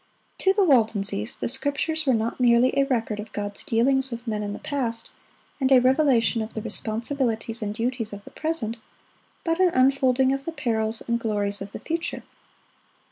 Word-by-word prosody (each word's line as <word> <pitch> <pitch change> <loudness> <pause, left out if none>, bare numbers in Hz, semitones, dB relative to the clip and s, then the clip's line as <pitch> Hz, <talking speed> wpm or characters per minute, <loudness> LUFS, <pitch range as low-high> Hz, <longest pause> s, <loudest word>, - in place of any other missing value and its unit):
To 385 - +4
the 395 +1 +3
Waldenses 215 - +1
the - - -3
Scriptures 285 +4 -1
were 260 - +4
not 225 +3 -2
merely 245 0 +4
a 275 - +3
record 225 -5 -1
of 210 +1 -7
God's 205 -1 -5
dealings 265 +4 +2
with 235 0 -6
men 215 -2 -2
in 205 -1 -3
the 205 - -5
past, 235 -6 -3 0.5
and 265 -1 +1
a 265 - +9
revelation 255 -3 +3
of 220 +1 -6
the 220 - -3
responsibilities 225 +1 -2
and 210 0 -3
duties 235 -1 -2
of 205 0 -8
the - - -13
present, 280 -8 -1 0.7
but 330 +1 0
an 370 -1 +5
unfolding 260 0 +3
of 275 0 -4
the 330 - -4
perils 220 -5 -1
and 235 0 +1
glories 205 -3 -1
of 195 0 -6
the - - -7
future. 330 0 -3
235 Hz, 185 wpm, -25 LUFS, 220-270 Hz, 0.7 s, a